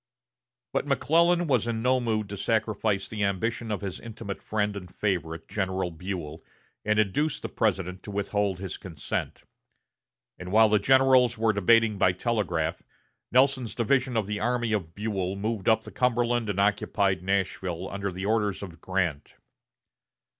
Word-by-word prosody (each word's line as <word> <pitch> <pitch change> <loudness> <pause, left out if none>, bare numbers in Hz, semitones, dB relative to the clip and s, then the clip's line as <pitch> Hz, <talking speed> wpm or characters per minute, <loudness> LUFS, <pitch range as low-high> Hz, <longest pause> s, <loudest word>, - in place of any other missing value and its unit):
But - - 0
McClellan 170 +2 +3
was 125 -7 +1
in 115 -1 -2
no 130 +1 +3
mood 110 -3 -1
to 100 - -5
sacrifice 105 -2 0
the 105 -2 -3
ambition 110 +4 -1
of 105 -1 -2
his 95 -3 -5
intimate 110 -3 -7
friend 105 -1 -1
and 90 -3 -7
favorite, 85 -6 -2
General 95 -2 -2
Buell, 80 -2 -6 0.4
and 105 0 +1
induced 110 +10 +1
the - - -3
President 95 -3 -1
to - - -10
withhold 100 -1 -1
his 95 0 -6
consent; 85 -6 -5 1.0
and 90 0 -7
while 110 +1 +6
the 105 0 +4
generals 130 0 +4
were 110 0 +2
debating 105 +1 +3
by 90 - +4
telegraph, 90 -6 -1 0.5
Nelson's 130 -3 +2
division 125 +1 +1
of 110 - +1
the 105 +1 -3
army 120 -1 0
of 85 -6 -3
Buell 100 -3 -2
moved 105 0 -1
up 110 0 +3
the - - -10
Cumberland 120 -2 +1
and 100 -1 -1
occupied 100 -2 +1
Nashville 95 -2 -1
under 100 0 -3
the 95 +2 -5
orders 105 -2 0
of 85 -4 -10
Grant. 90 -6 -2
105 Hz, 155 wpm, -27 LUFS, 95-115 Hz, 1.0 s, while